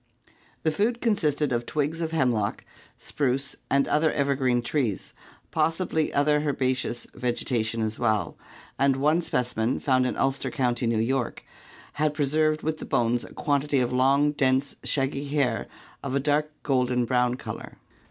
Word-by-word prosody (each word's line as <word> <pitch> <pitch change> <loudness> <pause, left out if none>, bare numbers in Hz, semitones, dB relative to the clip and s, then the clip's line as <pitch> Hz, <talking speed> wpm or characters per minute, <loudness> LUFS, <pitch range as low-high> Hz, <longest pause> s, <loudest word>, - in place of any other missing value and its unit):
The 160 - +2
food 220 +9 0
consisted 155 - +1
of 120 0 -1
twigs 155 +2 -1
of 165 - -1
hemlock, 125 -10 0 0.3
spruce 135 0 -2
and 140 0 +3
other 155 +1 +2
evergreen 135 -4 +1
trees, 120 -6 -1 0.4
possibly 165 -1 0
other 150 +1 +3
herbaceous 130 -4 -1
vegetation 115 -2 -1
as 110 0 -3
well, 110 -7 0 0.4
and 135 0 +4
one 150 +5 +2
specimen 125 -5 -1
found 130 -2 +2
in - - -3
Ulster 135 0 0
County, 120 -3 0
New 115 -1 +1
York, 120 +2 -1 0.6
had 150 -1 +2
pre 145 -1 +1
served 155 +2 +1
with 155 0 -2
the - - -6
bones 120 0 +1
a - - -11
quantity 145 -1 +1
of 125 0 0
long, 135 +3 +4
dense, 135 -1 +1
shaggy 140 0 -1
hair 140 -6 0 0.3
of 140 -1 -3
a - - +3
dark 150 +2 +1
golden 125 -3 +1
brown 125 0 +2
color. - - -8
135 Hz, 150 wpm, -26 LUFS, 125-150 Hz, 0.6 s, and